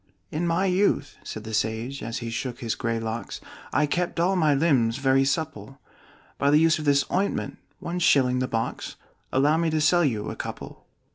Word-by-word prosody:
"In 165 Hz, +3 st, -1 dB
my 170 Hz, +3 st, +1 dB
youth," 185 Hz, -6 st, +1 dB
said 110 Hz, -, -7 dB
the 110 Hz, 0 st, -7 dB
sage, 110 Hz, +5 st, -2 dB
as 115 Hz, 0 st, -4 dB
he 115 Hz, -, -4 dB
shook 120 Hz, +1 st, -4 dB
his 115 Hz, -2 st, -1 dB
gray 115 Hz, -1 st, -2 dB
locks, 115 Hz, +1 st, -5 dB, 0.3 s
"I 150 Hz, -, +2 dB
kept 175 Hz, +3 st, -2 dB
all 180 Hz, +3 st, +2 dB
my 155 Hz, -5 st, +3 dB
limbs 130 Hz, -6 st, +2 dB
very 135 Hz, -1 st, +3 dB
supple 135 Hz, -4 st, -3 dB, 0.6 s
By 140 Hz, -, +3 dB
the 150 Hz, -, +5 dB
use 160 Hz, 0 st, +4 dB
of 155 Hz, -, -5 dB
this 140 Hz, -1 st, +3 dB
ointment 195 Hz, +2 st, -1 dB, 0.2 s
one 175 Hz, +1 st, -4 dB
shilling 130 Hz, -7 st, +3 dB
the 130 Hz, -, 0 dB
box 115 Hz, -1 st, -3 dB, 0.4 s
Allow 145 Hz, +4 st, +3 dB
me 165 Hz, 0 st, +1 dB
to 155 Hz, 0 st, 0 dB
sell 175 Hz, +3 st, +4 dB
you 110 Hz, -8 st, -1 dB
a -, -, -7 dB
couple." -, -, -8 dB
140 Hz, 195 wpm, -25 LUFS, 115-165 Hz, 0.6 s, the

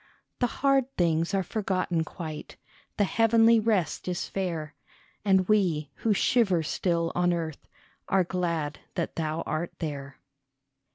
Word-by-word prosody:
The 245 Hz, -, +3 dB, 0.2 s
hard 275 Hz, -2 st, +4 dB
things 165 Hz, -1 st, +2 dB
are 190 Hz, -, +1 dB
forgotten 185 Hz, -4 st, -1 dB
quite, 155 Hz, -2 st, -7 dB, 0.4 s
The 205 Hz, -, +4 dB
heavenly 225 Hz, +2 st, +5 dB
rest 210 Hz, -9 st, 0 dB
is 180 Hz, 0 st, -2 dB
fair, 165 Hz, -6 st, -3 dB, 0.5 s
And 190 Hz, -3 st, +3 dB
we 175 Hz, -9 st, +2 dB
who 225 Hz, -, 0 dB
shiver 200 Hz, -5 st, +3 dB
still 170 Hz, +1 st, 0 dB
on 180 Hz, 0 st, +2 dB
earth 165 Hz, -3 st, -4 dB, 0.4 s
Are 190 Hz, -1 st, +4 dB
glad 170 Hz, -4 st, -2 dB, 0.2 s
that 170 Hz, -4 st, -2 dB
thou 160 Hz, 0 st, -2 dB
art 165 Hz, +2 st, -3 dB
there. 140 Hz, -3 st, -5 dB
175 Hz, 130 wpm, -27 LUFS, 160-200 Hz, 0.5 s, heavenly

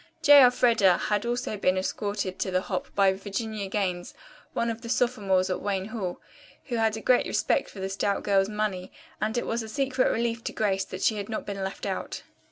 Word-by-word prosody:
J. 290 Hz, -1 st, +9 dB
Elfreda 235 Hz, -7 st, +5 dB
had 210 Hz, +2 st, -1 dB
also 240 Hz, -3 st, -2 dB
been 185 Hz, -1 st, +2 dB
escorted 200 Hz, 0 st, -3 dB
to -, -, -1 dB
the 185 Hz, 0 st, +1 dB
hop 185 Hz, -1 st, -3 dB
by 195 Hz, -1 st, +4 dB
Virginia 200 Hz, +1 st, -4 dB
Gaines, 185 Hz, -3 st, -2 dB, 0.4 s
one 235 Hz, 0 st, 0 dB
of 225 Hz, 0 st, -7 dB
the 230 Hz, -, -8 dB
sophomores 200 Hz, -7 st, +1 dB
at 185 Hz, -, -2 dB
Wayne 195 Hz, 0 st, -2 dB
Hall, 195 Hz, -6 st, -4 dB, 0.5 s
who 240 Hz, -, -1 dB
had 220 Hz, -1 st, +1 dB
a -, -, -6 dB
great 250 Hz, +2 st, +3 dB
respect -, -, +1 dB
for 200 Hz, -, -11 dB
the 190 Hz, -, -2 dB
stout 195 Hz, +1 st, -1 dB
girl's 195 Hz, -1 st, +2 dB
money, 210 Hz, -4 st, -3 dB, 0.3 s
and 220 Hz, +2 st, -1 dB
it -, -, -1 dB
was 230 Hz, +1 st, -1 dB
a 220 Hz, -, -7 dB
secret 265 Hz, 0 st, +1 dB
relief 230 Hz, 0 st, -1 dB
to -, -, -3 dB
Grace 195 Hz, -3 st, 0 dB
that 185 Hz, 0 st, -7 dB
she 220 Hz, -, +2 dB
had 205 Hz, +1 st, -5 dB
not 220 Hz, -, -4 dB
been 200 Hz, -1 st, -4 dB
left 190 Hz, 0 st, -5 dB
out. -, -, -4 dB
205 Hz, 210 wpm, -27 LUFS, 190-230 Hz, 0.5 s, J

